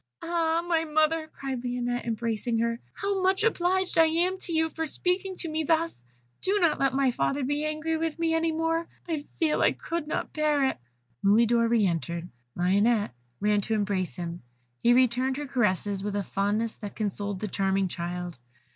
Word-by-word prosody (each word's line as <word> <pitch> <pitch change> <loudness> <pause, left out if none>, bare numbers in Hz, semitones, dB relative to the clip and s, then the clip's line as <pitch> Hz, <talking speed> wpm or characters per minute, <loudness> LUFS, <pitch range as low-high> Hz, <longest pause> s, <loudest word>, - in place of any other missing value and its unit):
"Ah! 335 0 +1
my 330 -2 +2
mother," 315 +1 +1
cried 270 -5 -5
Lionette, 245 0 -2
embracing 230 0 -1
her, 230 +1 0
"how 400 -1 -1
much 380 +2 +2
obliged 375 -4 +2
I 325 - +7
am 350 +4 +1
to 355 - -4
you 320 0 +1
for 320 +1 -3
speaking 370 +4 -1
to 345 - -1
me 315 0 -1
thus; 325 - 0 0.4
do 395 +2 +2
not 335 -5 +3
let 270 -1 +2
my 270 -2 +3
father 275 +3 0
be 290 +3 -1
angry 310 +1 -1
with 325 0 -2
me 330 -1 +1
any 325 0 +2
more 325 +1 0 0.2
I 320 -3 -1 0.2
feel 315 -2 +2
I - - +4
could 335 -2 -4
not - - -3
bear 300 -2 +2
it." 265 - -1 0.4
Mulidor 230 +3 +4
re 230 -3 +3
entered; 170 -1 -2 0.3
Lionette 200 - +2 0.3
ran 210 0 +2
to 220 +3 -1
embrace 195 - -1
him; 170 0 -5 0.4
he 235 - +5
returned 255 +1 +3
her 295 - -3
caresses 205 -6 0
with 205 0 -3
a 205 - 0
fondness 205 +4 0
that 205 -2 -7
consoled 205 -2 -2
the 215 - -3
charming 195 0 +1
child. 175 -2 -5
265 Hz, 180 wpm, -27 LUFS, 210-325 Hz, 0.4 s, I